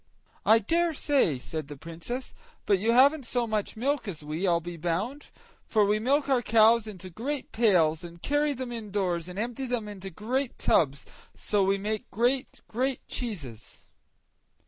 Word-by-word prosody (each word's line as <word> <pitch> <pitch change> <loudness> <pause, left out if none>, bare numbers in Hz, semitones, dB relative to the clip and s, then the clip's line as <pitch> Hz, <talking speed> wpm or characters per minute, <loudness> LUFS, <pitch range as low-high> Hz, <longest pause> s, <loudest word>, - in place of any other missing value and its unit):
"I 220 - +8
dare 335 +10 +1
say," 270 - +2
said 155 +3 -5
the 145 -1 -9
Princess; 170 - -6 0.3
"but 200 -2 +3
you 220 +4 +2
haven't 275 +2 +5
so 245 -1 +1
much 215 -1 -2
milk 275 +1 0
as 160 -6 -5
we, 155 +6 -2
I'll 170 -1 +3
be 175 +1 -7
bound; 180 - -3 0.4
for 215 -2 +3
we 210 +1 +2
milk 275 +6 +2
our 265 -3 +3
cows 225 0 +4
into 185 -3 -8
great 265 - -4
pails, 175 -8 +3
and 170 0 -10
carry 290 - +1
them 255 -2 -5
indoors, 195 -7 -2
and 180 - -8
empty 245 +4 -3
them 240 -3 -2
into 195 -2 -7
great 240 +8 -2
tubs, 140 -3 +2
and - - -22
so 205 -2 +1
we 195 +1 +2
make 215 +2 -3
great, 245 +4 0
great 255 +3 -2
cheeses." 145 - -6
215 Hz, 170 wpm, -28 LUFS, 175-250 Hz, 0.4 s, I